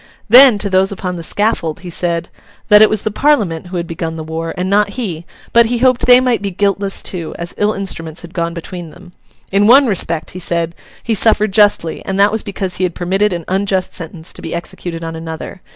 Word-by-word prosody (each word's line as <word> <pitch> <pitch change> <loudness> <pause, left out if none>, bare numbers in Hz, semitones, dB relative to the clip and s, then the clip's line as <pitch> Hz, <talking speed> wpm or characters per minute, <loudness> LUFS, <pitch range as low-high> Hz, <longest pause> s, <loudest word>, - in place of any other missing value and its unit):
Then, 250 0 +8
to 205 - -2
those 190 0 +2
upon 185 -2 -4
the 170 - -6
scaffold, 165 -3 -1
he 180 -1 -8
said, 170 -1 -2 0.4
'that 210 0 +7
it 215 - +7
was 215 -2 0
the 215 - -1
Parliament 205 - +1
who 180 0 -5
had 170 - -2
begun 165 -1 -5
the 160 - -6
war, 160 +1 -4
and 180 +1 -2
not 205 +1 +2
he; 175 -9 -4 0.3
but 235 -1 +6
he 240 +1 0
hoped 255 0 +2
they 250 0 +8
might 250 -3 0
be 200 - -2
guiltless 195 +1 0
too, 170 -4 -5
as 170 0 -5
ill 210 +1 +1
instruments 170 -5 -4
had 170 0 -11
gone 170 -1 -2
between 175 0 -7
them. 175 +2 -16 0.4
In 200 +2 +3
one 270 +4 +7
respect,' 170 -7 -1
he 185 - -8
said, 170 -1 -2 0.3
'he 230 - -1
suffered 215 -1 +2
justly; 205 -5 +2
and 195 0 -3
that 200 +1 +5
was 220 0 -2
because 190 -2 -4
he 185 - -2
had 180 -2 -1
permitted 195 +4 0
an 170 -2 -4
unjust 190 0 -1
sentence 165 -1 -9
to - - -10
be 165 - -5
executed 170 0 -6
on 165 0 -5
another. 160 +3 -7
185 Hz, 225 wpm, -16 LUFS, 170-210 Hz, 0.4 s, Then